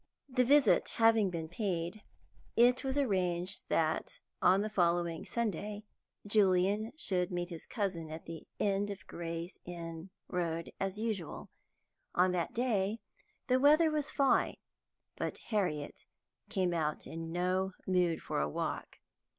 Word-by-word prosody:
The 255 -2 +2
visit 275 -2 +5
having 225 -3 +5
been 165 -2 -4
paid, 175 +1 -2 0.6
it 245 +3 +5
was 265 +1 -1
arranged 185 -7 0
that 160 -1 0 0.2
on 190 +2 +5
the 215 - -1
following 170 -4 +1
Sunday 210 -2 -2 0.4
Julian 205 +1 +3
should 180 - +1
meet 175 0 -3
his 165 - -7
cousin 185 -8 -2
at 160 +1 -7
the 165 -1 -8
end 200 0 +1
of 200 - -7
Gray's 170 +1 -5
Inn 170 0 -7 0.2
Road 170 -2 -2
as 195 +1 -2
usual. 215 -8 -3 0.6
On 180 +1 +4
that 175 -2 -1
day 220 -4 +1 0.5
the 255 -1 +3
weather 305 +4 +6
was 300 -1 -1
fine, 275 -4 +2 0.6
but - - -3
Harriet 180 -10 -2 0.4
came 185 -2 +1
out 155 -3 -1
in 165 0 -6
no 185 +2 0
mood 180 -3 +1
for - - -2
a 75 - 0
walk. - - -4
185 Hz, 135 wpm, -33 LUFS, 170-215 Hz, 0.6 s, weather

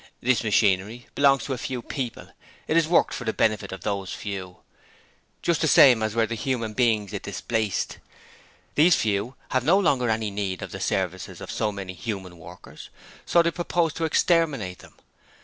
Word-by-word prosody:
This 125 -1 +1
machinery 105 +2 +1
belongs 140 -1 +4
to 135 - -2
a 125 - -5
few 125 -1 -4
people: 130 -5 -5 0.4
it 155 - 0
is 165 -2 +4
worked 170 - +3
for - - -5
the 110 -2 -1
benefit 110 -3 0
of 95 -2 -7
those 100 -1 -3
few, 95 -3 -6 0.9
just 170 -2 +1
the 160 - +2
same 130 -5 +7
as 110 0 -1
were 115 -1 +3
the 115 - -5
human 115 -2 -2
beings 110 -4 +1
it - - -4
displaced. 110 -4 -2 0.7
These 165 +3 +5
Few 110 +4 -1
have 130 -1 0
no 170 +8 +4
longer 135 - +2
any 110 -1 -1
need 100 -3 -3
of - - -7
the - - -6
services 95 -1 -2
of - - -7
so 105 - -1
many 95 -2 -6
human 95 -3 -6
workers, 85 +3 -12 0.4
so 170 - +4
they 170 - +1
propose 170 -2 0
to 165 - -2
exterminate 150 - +1
them! - - -16
115 Hz, 185 wpm, -25 LUFS, 100-140 Hz, 0.9 s, same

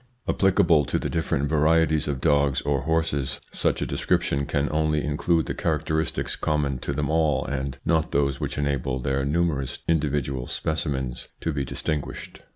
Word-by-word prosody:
Applicable 90 -5 +4
to - - 0
the - - -3
different 75 -4 0
varieties 80 0 +3
of 70 -2 -2
dogs 70 -1 +3
or 70 -2 0
horses, 80 -2 0
such - - 0
a - - -1
description 70 0 0
can 75 -2 0
only 75 -1 +1
include 80 +2 +1
the - - -3
characteristics 80 0 -1
common 75 -4 0
to 70 - -3
them 70 +1 -1
all 80 -2 +2
and 70 -1 -3
not 80 -1 +1
those 70 -1 +1
which - - -3
enable 70 -3 0
their 70 +2 -1
numerous 70 -4 0
individual 70 -5 0
specimens 70 -5 -2
to 80 - -1
be 70 -1 -1
distinguished. 75 +3 -4
75 Hz, 160 wpm, -25 LUFS, 70-80 Hz, -, Applicable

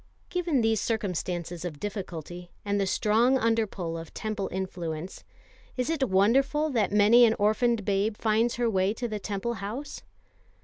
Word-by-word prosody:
Given 345 -7 +1
these 225 -2 +2
circumstances 180 -5 -3
of 160 -5 -5
difficulty, 180 -4 -6 0.2
and 205 0 0
the 195 - 0
strong 230 +7 +3
under 225 -2 +1
pull 165 -4 -5
of 165 -1 -11
Temple 215 -2 -3
influence 175 -3 -5 0.5
is 250 +5 0
it 280 -6 0
wonderful 270 +10 +3
that 225 -6 +1
many 210 +4 +6
an 225 -1 +5
orphaned 215 +1 +1
babe 205 +2 0
finds 225 +2 +1
her 240 0 0
way 195 -1 +1
to 240 - -3
the 215 -2 -4
Temple 205 +4 -3
house? 235 +9 -6
210 Hz, 160 wpm, -27 LUFS, 190-235 Hz, 0.5 s, many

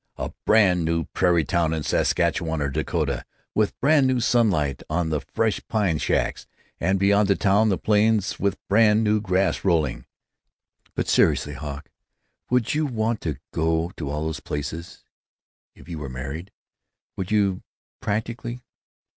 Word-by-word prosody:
a - - -4 0.2
brand 95 -5 +4
new 85 0 0
prairie 85 -4 +3
town 85 -1 +1
in 80 - -3
Saskatchewan 80 -1 0
or 70 -1 -1
Dakota, 65 - -2 0.3
with 105 -1 0
brand 140 -1 +4
new 130 -1 +1
sunlight 100 - +2
on 80 +1 0
the 75 - 0
fresh 110 -2 -1
pine 100 -8 +1
shacks, 70 - -1 0.3
and 95 +1 +1
beyond 100 +1 +3
the 100 - +3
town 105 +2 +3
the 95 - +1
plains 105 -1 +2
with 100 0 0
brand 105 +1 +4
new 105 0 +2
grass 95 -1 0
rolling." 75 -10 +1 0.9
"But - - -1
seriously, 75 - +2
Hawk, 70 +1 -7 0.6
would 125 -3 +1
you 155 0 +1
want 115 -2 -1
to 75 -5 -3 0.2
go 80 +1 0
to 75 -4 -4
all 75 +1 -2
those 80 0 -3
places, 75 +3 -6 0.7
if - - -16
you 85 -3 -6
were 70 -3 -5
married? 70 +9 -6 0.6
Would 95 - -4
you, 100 -3 +1 0.4
practically? 115 +3 -3
95 Hz, 150 wpm, -24 LUFS, 80-110 Hz, 0.9 s, brand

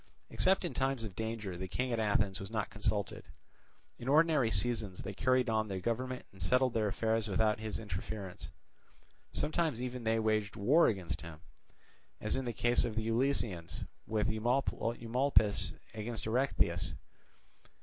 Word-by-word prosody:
Except 190 0 +3
in 175 - -2
times 135 -3 0
of 105 -4 -6
danger 110 -4 -3
the 95 +2 -4
king 125 +7 -1
at 115 - 0
Athens 100 -3 +1
was 95 - -6
not 110 -2 -2
consulted; 105 -1 -2 0.8
in 120 - -7
ordinary 150 -4 +4
seasons 105 -2 0
they 100 - -5
carried 130 +4 +2
on 110 -1 +1
their 95 -2 -3
government 125 +5 -2
and 95 - -14
settled 125 -1 +3
their 110 -2 +1
affairs 110 +2 0
without 105 +1 +2
his 110 -1 -3
interference; 100 -2 -6 0.8
sometimes 155 -3 0
even 125 -1 -4
they 115 0 +2
waged 110 -2 +1
war 140 +12 +5
against 90 -6 -2
him, 80 -2 -9 0.8
as - - 0
in 130 0 -1
the 120 - -1
case 120 +2 +2
of 115 -3 -2
the 110 0 -1
Eleusinians 115 -8 0 0.2
with 110 0 +1
Eumolpus 115 0 +1 0.2
against 110 +1 -4
Erechtheus. 125 +5 +1
110 Hz, 150 wpm, -33 LUFS, 105-125 Hz, 0.8 s, war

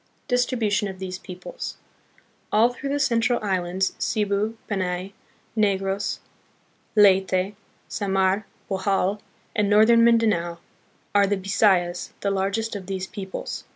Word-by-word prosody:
Distribution 240 -5 +1
of 190 -1 -7
These 185 -1 -5
Peoples. 185 - -7 0.7
All 220 +3 +5
through 275 +3 -5
the 285 +1 0
cen 235 -5 +2
tral 240 +1 +2
islands, 190 -1 0
Cebu, 210 +1 0
Panay, 185 -1 -2 0.4
Negros, 195 -2 0 0.8
Leyte, 190 -1 +4 0.3
Samar, 195 0 0 0.2
Bohol 195 +1 0 0.3
and 210 -2 +2
northern 220 +3 +6
Min 235 0 +6
danao, 175 -7 0 0.6
are 200 -1 +5
the 200 0 +1
Bi 190 +1 -8
sayas, 180 -4 +2
the 200 - 0
largest 200 +3 -1
of 190 -3 -6
these 190 -1 -3
peoples. 190 -2 -6
200 Hz, 125 wpm, -24 LUFS, 190-215 Hz, 0.8 s, northern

